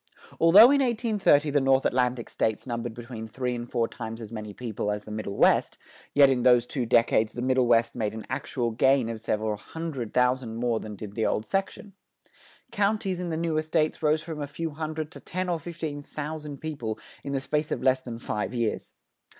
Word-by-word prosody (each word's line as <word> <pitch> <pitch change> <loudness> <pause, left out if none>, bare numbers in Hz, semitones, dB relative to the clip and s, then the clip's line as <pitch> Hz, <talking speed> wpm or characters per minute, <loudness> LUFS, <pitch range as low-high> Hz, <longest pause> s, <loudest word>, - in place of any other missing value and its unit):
Although 200 +10 +9
in 280 -1 +4
1830 215 - +2
the 145 0 +3
North 135 0 +3
Atlantic 125 -1 +1
States 110 -1 -1
numbered 120 -2 -4
between 120 -2 -7
three 125 +2 -3
and 120 0 -5
four 115 -2 0
times 115 0 -7
as 110 -2 -8
many 105 -2 -6
people 110 -2 -4
as 105 0 -2
the 105 - -9
Middle 105 -2 -4
West, - - +3 0.4
yet 140 -1 +8
in 130 -2 +1
those 125 -1 +5
two 125 -1 -3
decades 115 -1 +3
the 120 - -5
Middle 130 -1 +2
West 115 -1 +3
made 110 -3 -2
an 110 - -7
actual 125 -2 -2
gain 130 +1 +3
of 115 -1 -5
several 110 -1 -1
hundred 145 -5 -6
thousand 125 -2 +1
more 115 -1 0
than 105 -1 -7
did 100 0 -8
the 110 +1 0
old 110 - -1
section. 195 +1 -3 0.8
Counties 200 -2 0
in 180 -1 -3
the 160 - -2
newer 160 -1 0
states 155 0 0
rose 155 0 +2
from 160 -3 -6
a 145 - -3
few 160 +3 -4
hundred 155 0 -4
to - - -10
ten 185 +1 -4
or 170 -2 0
fifteen 160 -3 -5
thousand 150 -1 -6
people 130 -9 -4 0.3
in 140 - -4
the 135 - +1
space 150 +3 -1
of - - -3
less 130 0 +3
than 120 -3 -7
five 105 0 -3
years. 115 -2 -2
130 Hz, 205 wpm, -27 LUFS, 115-155 Hz, 0.8 s, Although